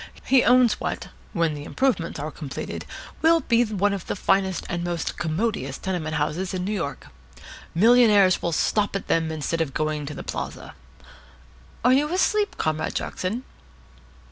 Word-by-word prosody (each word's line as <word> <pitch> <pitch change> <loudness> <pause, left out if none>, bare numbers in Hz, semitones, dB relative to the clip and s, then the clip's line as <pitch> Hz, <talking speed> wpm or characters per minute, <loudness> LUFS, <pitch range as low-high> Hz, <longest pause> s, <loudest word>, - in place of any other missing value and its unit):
He 265 -2 +4
owns 250 -2 +4
what, - - -4 0.2
when 165 -2 +1
the 145 -1 -6
improvements 190 - -1
are 155 +2 -4
completed, 145 -4 -6 0.4
will 330 +1 +5
be 235 -3 +3
the 200 -3 -1
finest 190 -1 +1
and 175 -2 -3
most 175 -1 -2
commodious 160 - -2
tenement 165 -5 -3
houses 170 +5 -1
in 180 0 -2
New 205 - -2
York. 165 -8 -4 0.7
Millionaires 210 -2 +5
will 170 - -1
stop 205 +5 +1
at 195 - -3
them 165 -1 +1
instead 160 +1 -2
of 145 -5 -2
going 155 -1 -1
to 150 - -6
the - - -7
Plaza. - - -6 1.1
Are 250 - +6
you 295 +4 +2
asleep, 410 +3 +1
Comrade 155 0 -1
Jackson?" 215 +8 -3
185 Hz, 150 wpm, -24 LUFS, 155-230 Hz, 1.1 s, Are